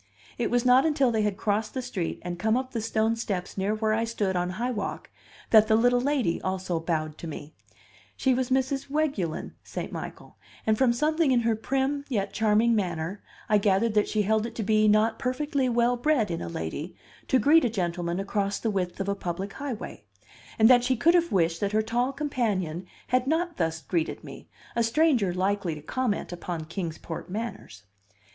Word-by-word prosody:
It 235 - 0
was 245 0 +1
not 255 +1 +6
until 280 -5 +2
they 220 -1 +1
had 210 -2 0
crossed 215 +1 -1
the 260 - -1
street 190 -9 -3
and 175 0 -5
come 220 +5 +2
up 260 0 -3
the 230 - -2
stone 220 +1 +1
steps 195 -6 -4
near 200 +2 0
where 215 0 0
I 225 +1 +1
stood 210 -4 -1
on 180 0 0
High 245 +2 -1
Walk 215 -4 -4 0.4
that 220 -1 +7
the 220 - +4
little 245 +2 +3
lady 265 -10 0
also 185 -2 -2
bowed 155 -2 -2
to 170 - -6
me; 155 0 -8 0.6
she 265 - +2
was 255 0 -1
Mrs. 265 +1 0
Weguelin 275 - -1
St. - - -6
Michael, - - -8 0.3
and 220 - +3
from 255 +1 +3
something 305 +5 +1
in 250 -2 +3
her 230 -1 +1
prim 270 +5 -1
yet 205 -6 -1
charming 220 +2 +3
manner 180 -1 -2 0.3
I 210 -1 +4
gathered 205 +2 +2
that 210 -1 +2
she 215 -1 +1
held 220 +2 +1
it 230 - -11
to 225 - -2
be 215 +1 +3
not 215 +2 +3
perfectly 270 +1 0
well 240 +1 +2
bred 245 - +1
in 165 - -3
a 85 - -4
lady 80 -1 -5 0.3
to 265 - +4
greet 310 +5 +5
a 245 - +2
gentleman 175 -3 -2
across 200 0 -1
the 225 - -1
width 185 -2 -2
of 195 - -2
a 200 - +1
public 195 +1 -4
highway, 270 - -6 0.5
and 220 - +6
that 245 0 +6
she 255 0 +1
could 330 +9 +4
have 340 -1 +2
wished 165 -3 +2
that 200 0 -1
her 215 0 +3
tall 240 +4 0
companion 210 - -2 0.2
had 255 +1 +2
not 335 +3 0
thus 160 -1 -1
greeted 165 -3 -2
me, - - -11 0.3
a 235 - +2
stranger 235 - +3
likely 185 -1 -1
to 150 - -9
comment 235 +3 -2
upon 170 -2 -5
Kings 165 -1 -4
Port 165 - -7
manners. 200 - -6
220 Hz, 200 wpm, -27 LUFS, 185-250 Hz, 0.6 s, that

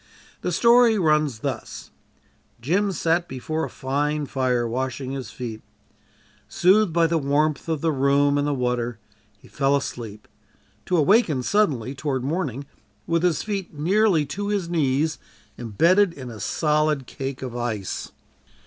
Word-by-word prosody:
The - - -2
story 235 -1 +5
runs 150 - +1
thus: - - -5 0.7
Jim 185 - +1
sat 170 0 0
before 155 +5 -3
a - - -7
fine 145 +3 -2
fire 125 -3 0
washing 130 +2 -3
his 135 -5 -5
feet. 115 -2 -7 0.9
Soothed 190 +2 +3
by 170 0 +3
the 165 0 +1
warmth 150 +2 0
of 160 -3 -1
the 165 - +1
room 140 +1 +2
and 145 - 0
the 145 - +1
water, 125 -2 -1 0.4
he - - -19
fell 140 0 +1
asleep 110 -6 -5 0.6
to 180 - +2
awaken 155 - +3
suddenly 140 - +1
toward 135 -2 -3
morning 140 -3 -2 0.4
with 165 -1 +1
his 175 -4 +1
feet 195 -6 -4
nearly 180 +1 +2
to 200 +9 -4
his 200 -4 -1
knees 155 -1 +1 0.4
embedded 170 - +3
in 130 -6 -8
a 110 - -9
solid 150 +3 0
cake 135 +1 -6
of 125 -2 -6
ice! 110 -5 -4
145 Hz, 145 wpm, -23 LUFS, 130-170 Hz, 0.9 s, story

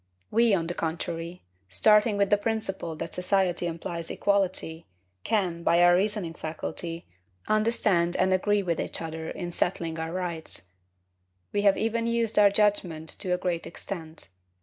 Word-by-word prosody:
We, 230 -2 +4
on 165 -3 -1
the 175 - -3
contrary, 170 +1 -4 0.3
starting 210 - +4
with 200 0 +1
the 205 - +6
principle 205 -6 -3
that 165 - -6
society 180 -1 +1
implies 170 0 -5
equality, 185 -5 -1 0.4
can, 180 -6 0
by 170 +1 +4
our 175 0 +7
reasoning 195 -3 0
faculty, 165 +1 -5 0.4
understand 215 -5 +2
and 190 - +2
agree 205 +2 +2
with 170 -3 -1
each - - -4
other 160 0 -5
in 175 -2 -5
settling 165 -2 -1
our 160 0 -3
rights; 170 - -5 0.9
we 205 - 0
have 200 -1 +4
even 230 +1 0
used 230 -2 +1
our 205 -1 +7
judgment 195 -6 0
to 185 - -3
a 180 - +3
great 175 -2 -2
extent. 165 - -8
180 Hz, 150 wpm, -27 LUFS, 165-205 Hz, 0.9 s, our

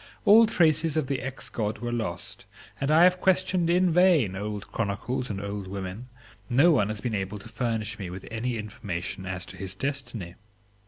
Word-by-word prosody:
All 225 +2 +8
traces 160 -5 +3
of 155 - +1
the 135 -1 -2
ex 135 0 -5
God 110 0 -2
were 120 0 -4
lost, 110 -7 -4 0.3
and 140 - -1
I 160 +3 +6
have 180 0 +4
questioned 185 -2 +2
in 180 +1 +3
vain 165 - +4
old 105 +1 -5
chronicles 115 +4 -2
and 100 -2 -3
old 100 -1 -5
women; 95 +4 -6 0.4
no 140 +8 +5
one 105 -9 +3
has 110 -1 -4
been 120 -3 -2
able 100 0 -2
to 100 - -11
furnish 115 -2 -3
me 95 -3 -5
with 90 +1 -8
any 115 +2 -2
information 100 -4 -5
as 95 -1 -3
to 95 0 -11
his 95 +1 -5
destiny. 125 -8 -4
115 Hz, 190 wpm, -27 LUFS, 100-150 Hz, 0.4 s, All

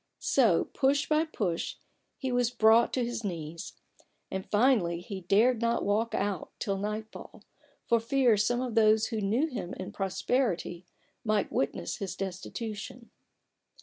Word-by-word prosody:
So 225 -11 +3
push 280 +1 +2
by 310 +1 +2
push 195 - -2 0.4
he 265 -2 -3
was 245 -1 +2
brought 225 0 +4
to 250 -2 +1
his 240 -1 -4
knees; 165 -4 -5 0.6
and 190 0 -4
finally 205 -7 +3
he 190 +2 -7
dared 220 +7 +3
not 235 0 +1
walk 215 +3 +1
out 200 -4 -2
till 195 -1 -2
nightfall, 210 +2 -6 0.4
for 235 - +3
fear 240 0 +3
some 240 +4 +1
of 250 -3 -3
those 220 -1 +4
who 220 -2 -2
knew 220 +9 +1
him 215 - -5
in 185 - -6
prosperity 190 -3 -1 0.4
might 215 -2 0
witness 135 - -2
his 195 -3 -4
destitution. 215 +5 -6
220 Hz, 145 wpm, -29 LUFS, 195-240 Hz, 0.6 s, brought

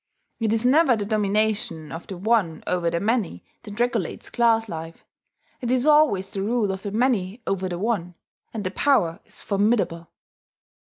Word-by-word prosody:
It 225 -2 0
is 225 +2 +1
never 275 0 +5
the 205 - -3
domination 210 -6 0
of 165 - -7
the 190 - -6
one 195 -5 +1
over 175 -2 0
the 170 0 -1
many 205 - -1 0.2
that 210 +1 -10
regulates 235 -7 -1
class 225 -1 +3
life: 165 -2 -8 0.6
it 240 - -2
is 255 +1 +2
always 295 -11 +4
the 195 - -3
rule 215 0 0
of 190 0 -5
the 205 - -4
many 225 -1 0
over 190 -1 -1
the 175 - -3
one, 185 -4 -2 0.4
and 220 -3 -5
the 185 - -2
power 195 -9 +2
is - - -10
formidable. 200 -5 0
205 Hz, 170 wpm, -24 LUFS, 180-235 Hz, 0.6 s, never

